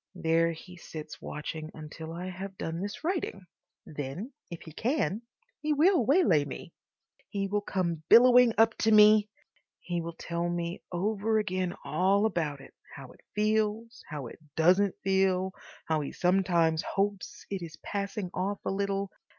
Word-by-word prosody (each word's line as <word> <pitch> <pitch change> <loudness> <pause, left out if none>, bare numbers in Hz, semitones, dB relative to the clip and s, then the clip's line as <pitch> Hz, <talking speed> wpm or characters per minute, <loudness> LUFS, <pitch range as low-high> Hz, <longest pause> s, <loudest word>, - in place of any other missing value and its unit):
There 165 +1 +2
he 180 +2 -11
sits 155 -2 -9
watching 155 +1 -6
until 160 +1 -8
I 180 +3 -5
have 190 +1 -7
done 165 +1 -4
this 205 +7 -5
writing. 335 - -2 0.4
Then, 150 - -6 0.2
if 170 -2 -8
he 160 - -10
can, 230 - 0 0.4
he 305 0 0
will 330 +1 +4
waylay 260 - +4
me. 145 - -8 0.6
He 195 -1 -2
will 205 +1 0
come 175 -5 -2
billowing 245 -1 +7
up 225 0 +5
to 220 - +3
me.... 210 0 +7 0.5
He 175 -1 -3
will 165 0 -6
tell 170 0 -2
me 170 0 -3
over 210 +4 0
again 185 -4 -1
all 190 +6 +2
about 155 -9 -1
it, - - -14 0.2
how 135 -2 -10
it - - -20
feels, 215 +2 0
how 150 -3 -5
it 115 - -10 0.2
doesn't 185 +4 +4
feel, 190 -1 +2 0.3
how 160 -1 0
he 145 - -5
sometimes 175 -3 +2
hopes 200 -1 -3
it 195 -2 -3
is 165 -2 -8
passing 200 -2 -3
off 195 +2 -1
a - - 0
little. 200 0 -1
190 Hz, 160 wpm, -29 LUFS, 165-210 Hz, 0.6 s, billowing